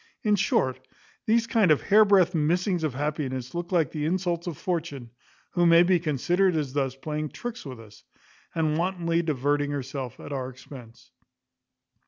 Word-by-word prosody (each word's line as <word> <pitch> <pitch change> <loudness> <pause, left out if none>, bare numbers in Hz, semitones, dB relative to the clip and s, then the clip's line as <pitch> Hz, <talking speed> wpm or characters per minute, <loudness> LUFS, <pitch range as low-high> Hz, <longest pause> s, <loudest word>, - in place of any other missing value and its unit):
In 210 -2 +3
short, 130 -9 +1 0.5
these 230 +1 +3
kind 225 -5 +2
of 155 - +4
hairbreadth 200 -3 +5
missings 175 +3 0
of 150 -5 -1
happiness 135 -3 -3
look 175 +1 -4
like 165 -7 +2
the 150 -1 -3
insults 175 0 -1
of 165 -5 -4
Fortune, 155 -9 -4 0.4
who 175 -1 +2
may 170 +1 +7
be 180 0 +3
considered 175 +4 +1
as 145 -4 -2
thus 135 -2 -1
playing 150 +2 -4
tricks 240 -3 -7
with 130 -3 -8
us, 105 -2 -15 0.5
and 155 -1 0
wantonly 170 -2 0
diverting 145 -2 0
herself 135 -3 -5
at - - -7
our 130 -2 -3
expense. 125 -3 -13
155 Hz, 160 wpm, -26 LUFS, 135-180 Hz, 0.5 s, may